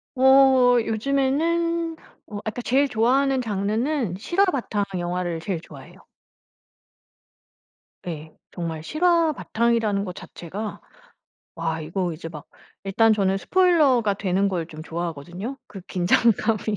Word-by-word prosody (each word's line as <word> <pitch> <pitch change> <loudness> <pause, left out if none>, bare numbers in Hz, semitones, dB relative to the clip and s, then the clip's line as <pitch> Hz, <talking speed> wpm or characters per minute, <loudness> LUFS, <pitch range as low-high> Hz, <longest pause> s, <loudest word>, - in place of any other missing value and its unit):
어 265 -1 +6
요즘에는 320 +8 0 0.3
어 205 - -6
그니까 220 +3 -4
제일 270 +4 +2
좋아하는 265 +3 +2
장르는 220 - -1
실화 345 - +2
바탕 245 - -1 0.2
영화를 175 -1 -2
제일 175 0 -3
좋아해요. 145 -5 -14 2.0
예. 155 -2 -7 0.2
정말 165 -3 -5
실화 335 - +2
바탕이라는 225 -5 0
것 180 - -6
자체가 200 +6 -7 0.7
와 165 -1 -2
이거 175 +2 -2
이제 165 +1 -8
막 150 -3 -10 0.4
일단 225 +3 +3
저는 195 -2 +1
스포일러가 290 - +3
되는 195 0 0
걸 180 -4 -2
좀 155 -2 -10
좋아하거든요. 175 - -5
그 195 -2 -10
긴장감이 215 +4 +2
215 Hz, 270 characters per minute, -23 LUFS, 175-270 Hz, 2.0 s, 어